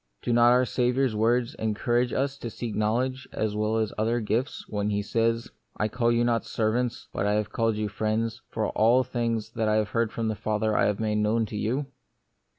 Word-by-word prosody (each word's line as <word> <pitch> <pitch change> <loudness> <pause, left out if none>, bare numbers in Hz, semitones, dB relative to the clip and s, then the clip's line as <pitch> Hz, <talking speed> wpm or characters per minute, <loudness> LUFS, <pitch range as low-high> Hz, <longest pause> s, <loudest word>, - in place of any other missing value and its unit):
Do 120 - 0
not 120 0 +6
our 125 +1 +4
Saviour's 125 0 +1
words 120 +2 +1
encour 115 +3 +1
age 125 - -1
us 135 +1 -1
to 120 - -5
seek 115 0 -5
knowledge 125 +5 -1
as 110 -1 -2
well 110 +1 0
as 110 -2 -1
other 115 +2 +1
gifts, 115 +5 -2
when 105 -1 -1
He 105 0 0
says, 115 +2 0
" - - -49
I 105 - 0
call 120 +1 +1
you 120 0 +2
not 120 -1 +1
servants, 115 +2 -1
but 100 - -1
I 105 - +2
have 105 0 -1
called 115 -3 +1
you 105 0 -1
friends, 110 +3 -2
for 110 -1 -1
all 120 +4 +4
things 115 -3 -2
that 110 -2 0
I 110 - +3
have 105 -1 +1
heard 115 -1 +1
of 115 - 0
my 110 - 0
Father 105 +1 -1
I - - +3
have 105 -1 -1
made 105 -1 0
known 105 +2 +2
unto 110 -1 -3
you." 120 +7 -1
115 Hz, 225 wpm, -27 LUFS, 110-120 Hz, -, not